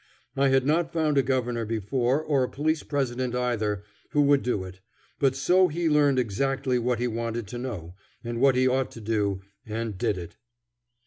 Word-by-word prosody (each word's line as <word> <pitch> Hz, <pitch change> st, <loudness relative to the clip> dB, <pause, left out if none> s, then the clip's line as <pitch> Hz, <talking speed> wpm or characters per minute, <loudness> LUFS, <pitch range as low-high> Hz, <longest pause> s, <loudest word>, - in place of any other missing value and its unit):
I 140 Hz, 0 st, +3 dB
had 135 Hz, -1 st, +3 dB
not 165 Hz, +3 st, +1 dB
found 155 Hz, -4 st, +2 dB
a -, -, +6 dB
Governor 125 Hz, -2 st, -1 dB
before, 120 Hz, +6 st, 0 dB
or 140 Hz, -4 st, +2 dB
a 125 Hz, -, -2 dB
Police 155 Hz, +3 st, 0 dB
President 130 Hz, -3 st, -2 dB
either, 110 Hz, -5 st, -1 dB, 0.3 s
who 145 Hz, -1 st, +4 dB
would 140 Hz, -1 st, +4 dB
do 115 Hz, -6 st, -1 dB
it; 95 Hz, 0 st, -10 dB, 0.4 s
but 135 Hz, -2 st, +2 dB
so 180 Hz, +7 st, +4 dB
he 170 Hz, +1 st, -1 dB
learned 145 Hz, -3 st, +4 dB
exactly 130 Hz, +3 st, 0 dB
what 120 Hz, 0 st, 0 dB
he 120 Hz, +2 st, 0 dB
wanted 115 Hz, 0 st, -3 dB
to 120 Hz, -, -5 dB
know, 100 Hz, -10 st, -6 dB, 0.3 s
and 120 Hz, 0 st, -4 dB
what 135 Hz, -1 st, +5 dB
he 130 Hz, 0 st, +3 dB
ought 130 Hz, 0 st, +1 dB
to -, -, -9 dB
do, 105 Hz, -3 st, -1 dB, 0.2 s
and 110 Hz, -2 st, -4 dB
did 100 Hz, -, 0 dB
it. 85 Hz, -1 st, -8 dB
125 Hz, 190 wpm, -26 LUFS, 115-140 Hz, 0.4 s, a